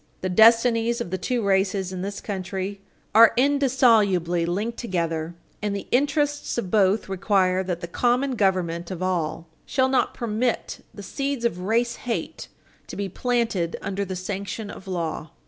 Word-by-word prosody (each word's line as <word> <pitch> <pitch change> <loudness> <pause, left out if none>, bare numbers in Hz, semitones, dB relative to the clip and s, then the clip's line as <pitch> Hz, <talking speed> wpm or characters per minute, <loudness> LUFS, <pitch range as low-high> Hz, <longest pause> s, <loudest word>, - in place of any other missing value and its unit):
The 185 - -2
destinies 230 +3 +4
of 205 -7 -5
the 185 - -2
two 245 +4 -1
races 195 -1 +1
in 180 - -4
this 200 +1 -5
country 195 0 -4 0.3
are 225 +1 +8
indissolubly 230 - +3
linked 210 +7 -2
together, 170 -6 -2 0.3
and 205 -1 -1
the 200 - -6
interests 290 +2 0
of 190 -7 -3
both 205 0 +3
require 190 -1 +1
that 180 -2 -3
the 170 - -5
common 245 +8 +1
government 185 -6 0
of 185 -1 -5
all 170 -3 -1 0.2
shall 260 0 +1
not 260 - +1
permit 235 +1 -2
the 205 - -10
seeds 275 +3 -3
of 180 -7 0
race 230 +5 0
hate 240 -2 -4 0.4
to - - -8
be 200 -1 -3
planted 225 -6 -1
under 200 0 -2
the 190 -1 -5
sanction 200 +2 -5
of 190 - -12
law. 165 -4 -3
200 Hz, 160 wpm, -24 LUFS, 185-235 Hz, 0.4 s, are